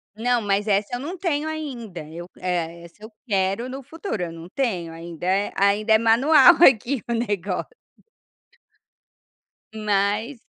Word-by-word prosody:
Não, 240 +1 +1
mas 205 +1 0
essa 205 +4 +1
eu - - -4
não 335 +7 -6
tenho 315 -4 -1
ainda, 245 - -6
eu 170 +2 -8
eh, 170 -2 -3
essa 170 +5 -16
eu 220 - -10 0.2
quero 195 +4 0
no 270 +1 -7
futuro, 305 - -5
eu 170 - -4
não 165 +1 -10
tenho, 190 -11 -2
ainda 165 +1 -8
é 195 +2 +1
ainda 205 +3 +2
é - - +7
manual 265 +10 +6
aqui 255 +1 +4
o 235 - -1
negócio. 205 -5 -2 2.0
Mas. 215 +4 -1
215 Hz, 150 wpm, -23 LUFS, 185-250 Hz, 2.0 s, é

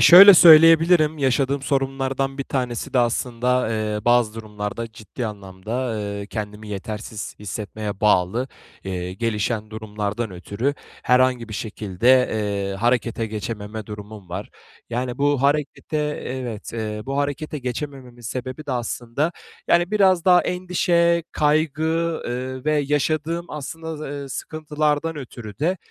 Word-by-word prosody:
şöyle 195 +3 +11
söyleyebilirim, 165 -1 +7
yaşadığım 135 +1 +1
sorunlardan 135 0 -1
bir 140 - -2
tanesi 125 -4 -3
de 130 - +3
aslında, 125 +1 +1
eee, 105 -1 -2
bazı 120 -2 +3
durumlarda 110 +1 -5
ciddi 115 +2 -6
anlamda, 100 -1 -8 0.2
ııı, 100 -2 -4
kendimi 105 0 -6
yetersiz 105 +1 -6
hissetmeye 105 0 -5
bağlı, 105 +5 +2 0.4
eee, 90 -1 -4
gelişen 110 0 -2
durumlardan 110 0 -4
ötürü 100 +9 -2 0.3
herhangi 125 -2 +3
bir 110 - -6
şekilde, 105 0 -2 0.2
eee, 100 -2 -2
harekete 115 +1 0
geçememe 105 0 -5
durumum 105 -2 -9
var. 95 +4 -6 0.4
Yani 125 +2 -2
bu 145 -1 +2
harekete, 145 +2 0 0.3
evet, 125 -5 -5
eee, 110 -2 -4
bu 135 - -2
harekete 145 +2 -2
geçemememin 125 -1 -6
sebebi 130 +5 -5
de 140 - -2
aslında, 120 +5 -2 0.4
yani, 175 +1 +3
biraz 190 -5 +4
daha 180 -2 +6
endişe, 175 -2 +1
kaygı, 155 0 +1 0.4
ııı, 130 +1 -4
ve 155 - +2
yaşadığım 155 +3 0
aslında 160 +2 -6
z - - -10
ııı, 140 -2 -5
sıkıntılardan 155 +2 -2
ötürü 120 -6 -9
de 170 +6 +1
125 Hz, 125 wpm, -22 LUFS, 105-150 Hz, 0.4 s, şöyle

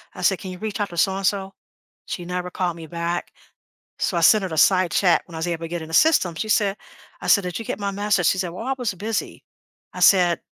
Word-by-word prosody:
I - - -8
said, 190 +1 +2
"Can 190 - -7
you 180 - -8
reach 215 +1 -5
out 205 - -1
to 170 - -10
so-and-so?" 195 +1 0 0.5
She 175 - -5
never 180 0 -4
called 175 -2 -2
me 165 -1 -9
back. 170 +2 -3 0.7
So 175 - 0
I - - +1
sent 200 +5 +5
her 190 - -3
the 160 - -5
side 185 0 +4
chat 180 -4 +3
when 170 - -12
I - - -5
was 170 - -2
able 170 -1 -3
to - - -3
get 175 0 -4
in 160 - -8
the 160 - -10
system. 190 - +4
She 215 +7 -4
said 205 -2 +2 0.5
I - - -5
said, 200 - +5
"Did 180 - -4
you - - -5
get - - -4
my 200 -1 -2
message?" 200 -3 +1
She - - +2
said, 185 -2 -2
"Well, 185 +7 -7
I 270 - 0
was 240 -6 -2
busy." 215 +4 -4 0.5
I - - -7
said, 175 -3 +5
185 Hz, 260 wpm, -22 LUFS, 175-200 Hz, 0.7 s, sent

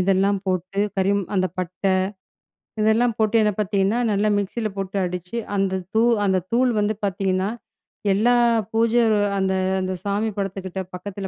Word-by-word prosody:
இதெல்லாம் 195 +2 +2
போட்டு, 185 +2 -1 0.2
கறிம் 200 +1 +2
அந்த 185 0 +2
பட்டை 185 +2 -1 0.9
இதெல்லாம் 225 +2 +3
போட்டு 220 +1 +2
என்ன 210 -1 +3
பாத்தீங்கன்னா, 200 +1 +1
நல்லா 205 +1 +2
மிக்ஸில 205 +3 -2
போட்டு 195 0 -3
அடிச்சு 180 +4 -5 0.2
அந்த 195 -1 +1 0.2
தூ 220 - +5 0.2
அந்த 190 -1 +2
தூள் 250 +2 +3
வந்து 210 +1 +1
பாத்தீங்கன்னா, 190 0 0 0.6
எல்லா 225 +5 +3 0.4
பூஜை 230 +1 +3
ரூ 215 - +3 0.2
அந்த 190 0 +1 0.3
அந்த 185 0 -2
சாமி 205 +2 0
படத்துக்கிட்ட 190 -1 -4
பக்கத்தில 195 +1 -6
195 Hz, 145 wpm, -22 LUFS, 190-215 Hz, 0.9 s, தூ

